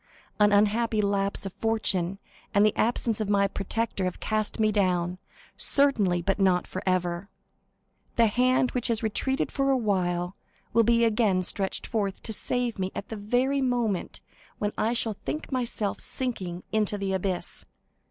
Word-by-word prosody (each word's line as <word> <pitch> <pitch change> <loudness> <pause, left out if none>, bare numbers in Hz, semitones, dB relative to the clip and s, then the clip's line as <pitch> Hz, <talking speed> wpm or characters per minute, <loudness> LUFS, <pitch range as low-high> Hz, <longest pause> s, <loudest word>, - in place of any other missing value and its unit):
An 210 0 +5
unhappy 215 +2 +3
lapse 200 -1 0
of 195 - -5
fortune 195 -5 0 0.4
and 205 +1 +6
the 215 - +2
absence 225 -1 +1
of 210 - -2
my 200 -1 +3
protector 200 0 -2
have 180 - -3
cast 215 +1 -1
me 215 -1 +3
down, 180 -3 +1 0.4
certainly, 210 -12 +2
but 195 +3 0
not 185 -2 +3
forever. 185 0 -2 0.9
The 230 - +5
hand 255 +3 +2
which 245 -2 -1
has 230 -1 0
retreated 265 +5 0
for 275 -1 0
a 270 - +4
while 180 -5 0 0.4
will 230 - +5
be 235 +1 +4
again 210 -5 +2
stretched 195 +1 -1
forth 200 -4 -2
to 220 - -2
save 245 0 -1
me 185 0 -1
at - - -6
the 225 - -4
very 250 +7 +1
moment 240 -7 -1 0.4
when 205 0 -1
I 225 +2 +1
shall 225 -3 -1
think 305 - -4
myself 235 -5 0
sinking 185 -9 -4
into 210 -1 +1
the 195 -1 -2
abyss. 190 -1 -2
210 Hz, 160 wpm, -27 LUFS, 190-230 Hz, 0.9 s, and